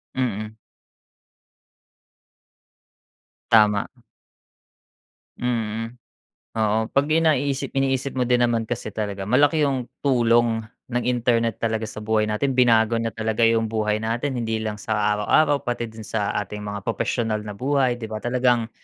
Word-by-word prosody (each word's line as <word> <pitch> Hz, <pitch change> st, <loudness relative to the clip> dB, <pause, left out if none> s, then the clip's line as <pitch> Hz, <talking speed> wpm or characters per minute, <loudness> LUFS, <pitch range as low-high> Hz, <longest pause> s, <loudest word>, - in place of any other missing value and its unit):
Mm. 110 Hz, -4 st, -2 dB, 3.0 s
Tama. 105 Hz, -2 st, +5 dB, 1.5 s
Mm. 115 Hz, -1 st, -2 dB, 0.6 s
Oo, 110 Hz, 0 st, +2 dB
pag 140 Hz, +1 st, +2 dB
'yan, 160 Hz, +1 st, +3 dB
naiisip 140 Hz, -2 st, -1 dB
iniisip 135 Hz, 0 st, 0 dB
mo 125 Hz, -1 st, 0 dB
din 125 Hz, 0 st, +3 dB
naman 115 Hz, -1 st, 0 dB
kasi 110 Hz, -1 st, -4 dB
talaga, 100 Hz, -2 st, -3 dB
malaki 145 Hz, +7 st, +3 dB
,yung 130 Hz, -3 st, -2 dB, 0.2 s
tulong 120 Hz, -3 st, +3 dB, 0.3 s
ng 125 Hz, 0 st, 0 dB
internet 115 Hz, -2 st, +1 dB
talaga 110 Hz, -1 st, -1 dB
sa -, -, -12 dB
buhay 110 Hz, 0 st, +1 dB
natin, 130 Hz, +6 st, 0 dB
binago 115 Hz, -2 st, +4 dB
niya 115 Hz, 0 st, -1 dB
talaga 110 Hz, +1 st, -2 dB
'yung 115 Hz, 0 st, +3 dB
buhay 105 Hz, -1 st, 0 dB
natin, 120 Hz, +4 st, -2 dB
hindi 110 Hz, -1 st, -2 dB
lang 110 Hz, -1 st, -3 dB
sa 110 Hz, +1 st, -3 dB, 0.2 s
araw-araw, 140 Hz, +8 st, +2 dB
pati 120 Hz, -1 st, -2 dB
din 110 Hz, -1 st, -10 dB
sa 105 Hz, -2 st, -1 dB, 0.2 s
ating 105 Hz, +2 st, -7 dB
mga 100 Hz, 0 st, -5 dB
propesyonal 115 Hz, -1 st, -1 dB
na 105 Hz, -1 st, -7 dB
buhay 130 Hz, -1 st, +1 dB
'di 115 Hz, -, -6 dB
ba? 110 Hz, 0 st, -5 dB
Talagang, 120 Hz, -2 st, +1 dB
115 Hz, 135 wpm, -23 LUFS, 110-125 Hz, 3.0 s, Tama